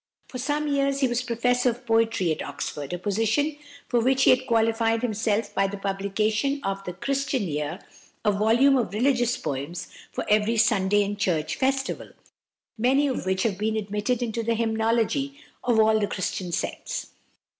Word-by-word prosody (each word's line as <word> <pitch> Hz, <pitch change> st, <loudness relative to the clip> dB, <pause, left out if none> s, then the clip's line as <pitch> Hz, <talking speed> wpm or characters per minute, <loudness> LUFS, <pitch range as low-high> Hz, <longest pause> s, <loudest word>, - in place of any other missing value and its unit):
For 255 Hz, -, -6 dB
some 295 Hz, +4 st, -1 dB
years 275 Hz, -1 st, +1 dB
he 265 Hz, -, +4 dB
was 240 Hz, 0 st, 0 dB
Professor 245 Hz, +1 st, +1 dB
of 245 Hz, +2 st, -6 dB
Poetry 225 Hz, -6 st, +2 dB
at 155 Hz, -, -2 dB
Oxford, 145 Hz, -2 st, -5 dB
a 180 Hz, -, -2 dB
position 225 Hz, -, 0 dB, 0.3 s
for 240 Hz, -, +2 dB
which 265 Hz, +3 st, +3 dB
he -, -, +7 dB
had 255 Hz, 0 st, +2 dB
qualified 225 Hz, 0 st, +2 dB
himself 220 Hz, -2 st, 0 dB
by 195 Hz, -, +2 dB
the 200 Hz, +1 st, -5 dB
publication 210 Hz, +7 st, -1 dB
of 195 Hz, 0 st, -2 dB
the 180 Hz, -, -4 dB
"Christian 275 Hz, +3 st, -1 dB
Year," 150 Hz, -4 st, -3 dB, 0.5 s
a 210 Hz, -, +5 dB
volume 230 Hz, +7 st, +4 dB
of 215 Hz, -6 st, -1 dB
religious 245 Hz, 0 st, +2 dB
poems 145 Hz, +6 st, -4 dB, 0.2 s
for -, -, -4 dB
every 215 Hz, +2 st, +2 dB
Sunday 205 Hz, -2 st, +3 dB
and 205 Hz, +1 st, -4 dB
church 160 Hz, -6 st, 0 dB
festival, 270 Hz, 0 st, -1 dB, 0.7 s
many 265 Hz, +5 st, +3 dB
of 260 Hz, -8 st, -2 dB
which 190 Hz, 0 st, +1 dB
have 205 Hz, -4 st, -1 dB
been 220 Hz, +1 st, 0 dB
admitted 210 Hz, +4 st, -1 dB
into 230 Hz, -1 st, -2 dB
the 230 Hz, 0 st, 0 dB
hymnology 230 Hz, +5 st, 0 dB, 0.2 s
of 240 Hz, -2 st, +2 dB
all 220 Hz, 0 st, +5 dB
the 205 Hz, -, 0 dB
Christian 185 Hz, -1 st, -3 dB
sects. -, -, -4 dB
225 Hz, 170 wpm, -25 LUFS, 200-250 Hz, 0.7 s, he